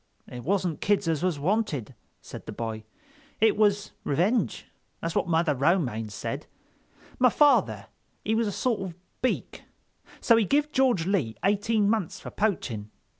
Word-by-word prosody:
"It 125 -1 -8
wasn't 180 -1 0
kids 205 -3 +1
as 160 -2 0
was 180 -4 0
wanted," 150 - -1 0.3
said - - -10
the - - -4
boy, 110 -1 -5 0.5
"it 220 0 +4
was 205 -1 +2
revenge. 190 - 0 0.3
That's 165 0 -3
what 205 - 0
Mother 165 -2 +2
Romaine 135 - +1
said—my 250 - -4
father 290 +5 +3 0.4
he 220 - +1
was 225 0 +1
a - - -1
sort 230 0 -1
of 185 -3 -5 0.3
Beak, 255 - -2 0.6
so 230 - +5
he 225 - +4
give 295 +7 +1
George 255 - +2
Lee 170 - 0
eighteen 205 +1 +2
months 210 -6 0
for - - -8
poaching. 125 - -2
195 Hz, 150 wpm, -27 LUFS, 150-220 Hz, 0.6 s, so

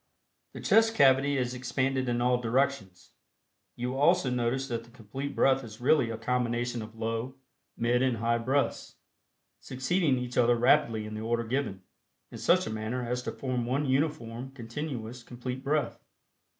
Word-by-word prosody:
The - - -8
chest 225 0 +4
cavity 140 -3 +4
is 125 -1 -1
expanded 130 +1 -1
in 120 0 0
all 125 0 +2
directions. 120 -6 -1 0.6
You 125 +1 -3
will 135 - -4
also 165 -3 +4
notice 125 +2 0
that 115 -2 -3
the 115 - -18
Complete 125 +5 -6
Breath 135 0 +3
is 110 -1 -10
really 125 -1 +3
a 115 - -4
combination 120 0 -1
of 110 +1 -9
Low, 115 +3 -3 0.4
Mid 120 +1 +2
and 130 -3 +1
High 115 +1 +1
Breaths, 135 +4 -1 0.6
succeeding 135 +2 0
each 125 0 -2
other 120 0 +5
rapidly 120 -3 +3
in 105 - -7
the 110 - -5
order 115 +1 0
given, 115 -6 -2 0.5
in - - -8
such - - +3
a 110 - -4
manner 115 +3 -3
as 125 +1 -1
to - - -4
form 125 -3 -3
one 135 +4 0
uniform, 130 -3 -1
continuous, 125 -1 -6
complete 125 +2 -6
breath. 145 -2 -1
125 Hz, 165 wpm, -29 LUFS, 115-135 Hz, 0.6 s, other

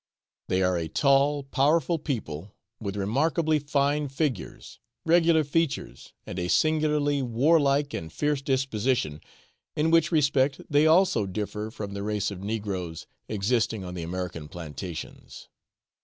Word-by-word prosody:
They 95 +1 +1
are 90 -1 +2
a 80 - -3
tall, 140 - +3
powerful 155 +5 +2
people, 100 - -5 0.2
with 100 -3 -4
remarkably 155 - +1
fine 145 +1 0
figures, 135 - -4 0.3
regular 165 -1 +4
features, 155 +1 -2
and 90 - -5
a 90 - -2
singularly 150 - +2
warlike 140 +3 +2
and 80 -1 -5
fierce 145 - 0
disposition, 130 - 0 0.5
in 155 +2 +1
which 165 +1 +4
respect 140 -3 +2
they 145 +2 +4
also 160 - +4
differ 105 +2 -4
from 105 -3 -7
the 100 - -4
race 105 -1 -1
of 95 -2 -7
negroes 100 -6 -4 0.2
existing 110 0 0
on 90 -1 -6
the 90 - -5
American 85 -2 -5
plantations. 85 0 -8
130 Hz, 130 wpm, -26 LUFS, 95-150 Hz, 0.5 s, regular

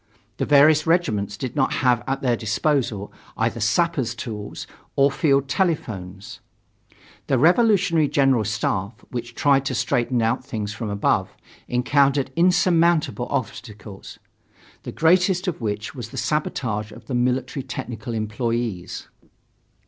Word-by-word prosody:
The - - -2
various 150 +2 +5
regiments 105 - +1
did 125 +1 -5
not 135 -3 +1
have 120 -2 +3
at 135 +1 -2
their 125 -2 +2
disposal 110 -2 -1 0.2
either - - -1
sappers' 120 +3 +1
tools 105 -4 -6 0.3
or 140 +1 +4
field 140 -3 +2
telephones. 100 - -3 0.9
The 135 - +2
Revolutionary 175 - +3
General 135 -5 +2
Staff, 105 +1 -3
which 120 -1 -6
tried 140 -2 +3
to 130 - -2
straighten 120 +1 0
out 115 +3 0
things 105 -5 -4
from 105 +2 -5
above, 100 -2 +1 0.4
encountered 135 +2 +2
insurmountable 170 -6 +2
obstacles, 105 -5 -6 0.6
the - - -7
greatest 180 +3 +2
of 170 -7 -3
which 105 -1 -3
was 120 -5 -7
the - - -10
sabotage 115 -8 -2
of - - -13
the 135 - -6
military 125 +2 0
technical 120 -3 -6
employees. 110 -2 -3
125 Hz, 125 wpm, -23 LUFS, 110-145 Hz, 0.9 s, various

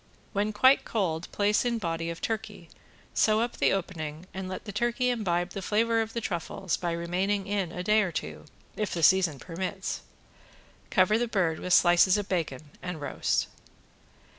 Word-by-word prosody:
When 205 +2 0
quite 260 +6 +5
cold 180 -6 -2
place 205 +1 +2
in 240 -1 0
body 165 -4 -2
of 170 - -6
turkey, 225 -1 -4 0.4
sew 215 0 +3
up 240 +1 -2
the - - +3
opening 165 -4 -3
and 190 -1 -5
let 185 - -6
the 210 - -5
turkey 240 +4 +1
imbibe 175 -6 -1
the 195 - -5
flavor 225 +3 +2
of 220 0 -4
the 235 - -2
truffles 180 -1 -2
by 175 -1 -2
remaining 185 +4 -1
in 195 -4 -1
a 180 - -5
day 215 +3 +4
or 190 -4 -1
two, 75 - -5 0.3
if 210 -2 -2
the 165 - -2
season 180 -3 +5
permits. 185 +5 -4 0.9
Cover 190 +4 +3
the 240 - 0
bird 180 -8 0
with 180 - -1
slices 175 +2 +5
of 205 -1 -3
bacon 155 -5 -3
and 180 -3 -5
roast. 145 - 0
190 Hz, 175 wpm, -28 LUFS, 170-215 Hz, 0.9 s, quite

